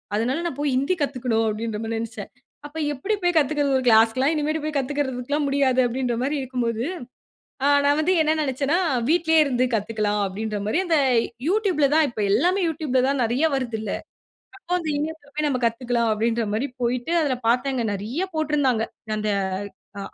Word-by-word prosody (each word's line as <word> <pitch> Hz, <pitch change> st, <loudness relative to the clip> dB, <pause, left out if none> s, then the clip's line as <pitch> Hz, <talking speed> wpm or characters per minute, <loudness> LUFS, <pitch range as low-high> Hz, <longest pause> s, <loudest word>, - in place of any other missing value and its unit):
அதனால 250 Hz, +9 st, 0 dB
"நான் 285 Hz, -6 st, -3 dB
போயி 290 Hz, -2 st, 0 dB
ஹிந்தி 280 Hz, +8 st, +1 dB
கத்துக்கணும்" 250 Hz, -5 st, 0 dB
அப்டின்ற 215 Hz, 0 st, -3 dB
மாரி 225 Hz, 0 st, -3 dB
நெனைச்சேன். 225 Hz, -3 st, -6 dB, 0.4 s
அப்ப 295 Hz, +2 st, -9 dB, 0.2 s
எப்டி 290 Hz, +11 st, -2 dB
போயி 355 Hz, -, +2 dB
கத்துக்கறது? 290 Hz, -2 st, +2 dB
ஒரு 260 Hz, -, -2 dB
கிளாஸ்க்குலாம் 230 Hz, +5 st, +4 dB
இனிமேட் 310 Hz, +1 st, -1 dB
போயி` 310 Hz, 0 st, -3 dB
கத்துக்கலாம் 280 Hz, +1 st, -1 dB
முடியாது 275 Hz, -2 st, +2 dB
அப்டின்ற 245 Hz, 0 st, -1 dB
மாரி 285 Hz, +3 st, 0 dB
இருக்கும் 255 Hz, -2 st, -3 dB
போது, 230 Hz, 0 st, -1 dB, 0.8 s
அ, -, -, +4 dB, 0.2 s
நான் 285 Hz, +1 st, +3 dB
வந்து 355 Hz, +4 st, +2 dB
என்ன 310 Hz, 0 st, +2 dB
நெனைச்சேன்னா, 275 Hz, +3 st, 0 dB, 0.3 s
"வீட்லே 320 Hz, 0 st, +3 dB
இருந்து 255 Hz, -4 st, 0 dB
கத்துக்கலாம்" 210 Hz, -1 st, 0 dB
அப்டின்ற 210 Hz, +2 st, -4 dB
மாரி 215 Hz, -, +1 dB
அந்த 330 Hz, -3 st, +2 dB, 0.5 s
Youtubeல 370 Hz, -7 st, +2 dB
தான் 315 Hz, 0 st, +5 dB
இப்ப 230 Hz, -, -9 dB
எல்லாமே 365 Hz, -, +2 dB
Youtubeல 300 Hz, -5 st, 0 dB
தான் 275 Hz, -1 st, 0 dB
நெறையா 250 Hz, +8 st, +2 dB
வருதுல்ல. 230 Hz, -5 st, -3 dB, 0.7 s
அப்ப 350 Hz, -, -26 dB
அந்த 320 Hz, -3 st, -4 dB
இணையத்தில 300 Hz, -1 st, -5 dB
போயி 305 Hz, 0 st, 0 dB
நம்ம 255 Hz, -3 st, -1 dB
கத்துக்கலாம் 235 Hz, 0 st, 0 dB
அப்டின்ற 230 Hz, +1 st, 0 dB
மாரி 230 Hz, +6 st, 0 dB, 0.2 s
போயிட்டு 245 Hz, +6 st, -1 dB
அதுல 265 Hz, -5 st, 0 dB
பார்த்தேங்க 250 Hz, 0 st, +1 dB
நெறையா 235 Hz, -, -3 dB
போட்டிருந்தாங்க. 285 Hz, -7 st, +1 dB, 0.3 s
அந்த 215 Hz, 0 st, -2 dB, 0.7 s
"அ, -, -, -4 dB
265 Hz, 165 wpm, -23 LUFS, 230-300 Hz, 0.8 s, தான்